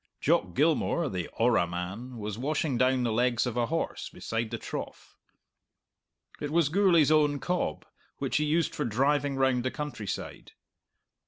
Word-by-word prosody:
Jock 90 - +1
Gilmour, 160 +1 +2
the 90 -5 -3
"orra" 115 -6 +3
man, 95 +9 -5
was 105 -2 -4
washing 150 +1 0
down 130 +1 +2
the 120 - 0
legs 120 +1 +2
of 125 -2 -3
a 120 -1 +1
horse 165 +1 -3
beside 115 0 -3
the - - -3
trough. - - -7 1.2
It 145 - -3
was 165 -3 +3
Gourlay's 170 -4 +4
own 150 -2 +4
cob, 175 - -2 0.3
which - - -1
he 150 - +1
used 160 +1 +1
for - - -2
driving 140 +4 +1
round 130 -2 +2
the 130 - 0
countryside. 130 -8 -6
130 Hz, 155 wpm, -28 LUFS, 115-150 Hz, 1.2 s, Gourlay's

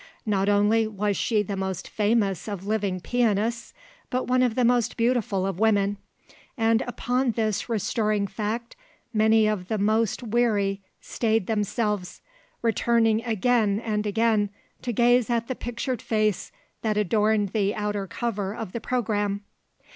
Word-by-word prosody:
Not 200 -2 +1
only 210 +2 +3
was 210 -1 -1
she 215 0 +1
the 200 0 -4
most 190 -1 -3
famous 205 -4 0
of 200 -3 -5
living 205 -3 -1
pianists 230 0 0 0.4
but 255 +1 -1
one 255 0 +2
of 245 -3 +2
the 250 - +2
most 240 -2 +2
beautiful 230 -5 +1
of 195 -2 -3
women; 205 -2 +2 0.6
and 225 0 +3
upon 245 +1 0
this 215 0 -1
restoring 215 -1 0
fact 220 +4 -4 0.4
many 220 0 +4
of 210 -4 -1
the 220 - -1
most 215 +3 +1
weary 210 -4 +1 0.2
stayed 225 -3 0
themselves, 210 -2 -2 0.4
returning 230 -1 +2
again 220 -2 +2
and 215 -2 -2
again 215 -1 +2 0.3
to 245 - -2
gaze 240 +1 +3
at 235 -1 0
the 260 - -2
pictured 240 0 -4
face 215 -3 0 0.3
that 215 -2 0
adorned 210 0 +2
the 205 0 0
outer 210 -2 -2
cover 205 -1 -3
of 225 -5 -6
the 235 - -5
programme. 205 -4 -1
215 Hz, 145 wpm, -25 LUFS, 205-230 Hz, 0.6 s, many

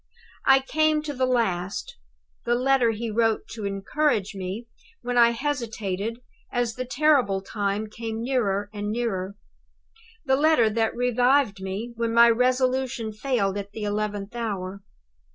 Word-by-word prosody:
"I 270 0 +7
came 310 +2 +1
to 300 -1 -4
the 255 -1 0
last 195 -7 -1 0.5
the 240 - +1
letter 255 -1 +3
he 225 +1 -3
wrote 225 0 +1
to 215 -2 -6
encourage 205 +2 0
me, 195 +4 -5 0.4
when 245 0 -2
I 235 -1 +7
hesitated 230 -4 -3 0.3
as 245 -2 0
the 255 +2 -4
terrible 255 -7 +2
time 205 +1 -2
came 225 +1 -6
nearer 205 -6 0
and 205 0 -4
nearer; 200 -4 -2 0.9
the 265 -1 +3
letter 290 -7 +4
that 225 0 0
revived 245 -3 +2
me 200 +5 -5
when 230 0 -1
my 235 0 +8
resolution 255 -1 +1
failed 210 -4 0
at 200 0 -8
the 220 - -5
eleventh 205 0 -3
hour. 200 -4 -4
230 Hz, 140 wpm, -25 LUFS, 205-255 Hz, 0.9 s, my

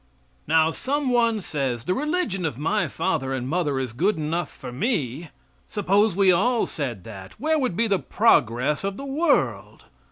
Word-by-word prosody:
Now 160 +1 +4
some 275 - -1
one 230 -3 +2
says, 135 -8 -3
"The 180 - 0
religion 300 - -1
of 155 -8 -2
my 165 +9 0
father 135 -8 -1
and 125 -1 -3
mother 150 -2 0
is 130 -4 -4
good 185 - +1
enough 155 +1 -2
for - - -9
me." 155 - -2 0.4
Suppose 205 0 +2
we 195 -1 +5
all 230 +7 +2
said 120 - -5
that, 95 -2 -10
where 315 +1 +1
would 255 -10 -1
be 230 - +3
the 200 -4 +1
progress 140 - +2
of 195 0 -3
the 275 - -6
world? 290 +5 0
180 Hz, 170 wpm, -24 LUFS, 135-230 Hz, 0.4 s, we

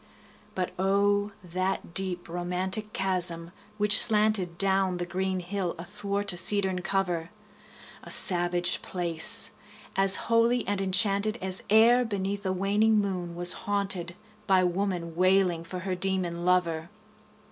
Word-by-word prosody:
But 185 -1 -2
O, 200 +2 +1
that 185 0 -3
deep 180 -2 -1
romantic 180 +4 -2
chasm 175 -4 -2 0.3
which 210 0 +7
slanted 210 -6 +2
Down 190 -1 +1
the 175 - -3
green 185 +1 -3
hill 180 -1 -4
athwart 200 +3 -2
a - - -5
cedarn 190 -1 +1
cover! 180 -3 -2 0.7
A - - -11
savage 175 -1 +2
place! 170 -3 0 0.4
as 195 0 +5
holy 235 +1 +2
and 200 -1 -1
enchanted 200 +3 +1
As 190 0 +2
e'er 235 +3 +5
beneath 200 -2 -4
a - - 0
waning 205 +4 +1
moon 185 -4 -3
was 175 +1 +3 0.2
haunted 195 -4 -1
15 175 - -11 0.3
By 190 -2 +4
woman 180 -2 -2
wailing 185 -2 +2
for 180 +2 -7
her 190 0 -3
demon 180 -2 -2
lover! 170 -2 0
190 Hz, 135 wpm, -27 LUFS, 175-200 Hz, 0.7 s, which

